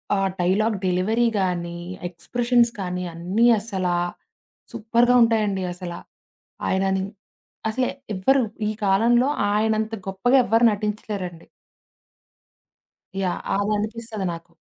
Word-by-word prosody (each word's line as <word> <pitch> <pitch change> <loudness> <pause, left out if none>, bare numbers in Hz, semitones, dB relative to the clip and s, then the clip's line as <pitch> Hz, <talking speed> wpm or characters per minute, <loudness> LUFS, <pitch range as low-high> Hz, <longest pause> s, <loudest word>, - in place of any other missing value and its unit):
ఆహ్, 195 -1 +1
dialogue 205 +5 +2
delivery 210 +7 +2
గానీ 175 -2 -2 0.3
expressions 240 +6 +1
కానీ 180 -1 -3
అన్నీ 185 +8 +1
అసలా, 190 -5 -2 0.8
సూపర్‌గా 235 +2 +2
ఉంటాయండి 210 -4 +1
అసల. 175 -1 -7 0.8
ఆయనని, 190 0 +1 0.7
అసల 255 +3 0 0.3
ఎవ్వరు 265 +8 +3 0.3
ఈ - - -1
కాలంలో 235 +6 +4 0.3
ఆయనంత 220 +1 +1
గొప్పగా 220 +8 +3
ఎవ్వరు 225 +2 +3
నటించలేరండి. 205 -4 -4 1.8
యాహ్! 180 -2 -1 0.2
అది 205 +1 0
అనిపిస్తది 220 -1 -4
నాకు. 170 +1 -11
205 Hz, 100 wpm, -23 LUFS, 185-230 Hz, 1.8 s, కాలంలో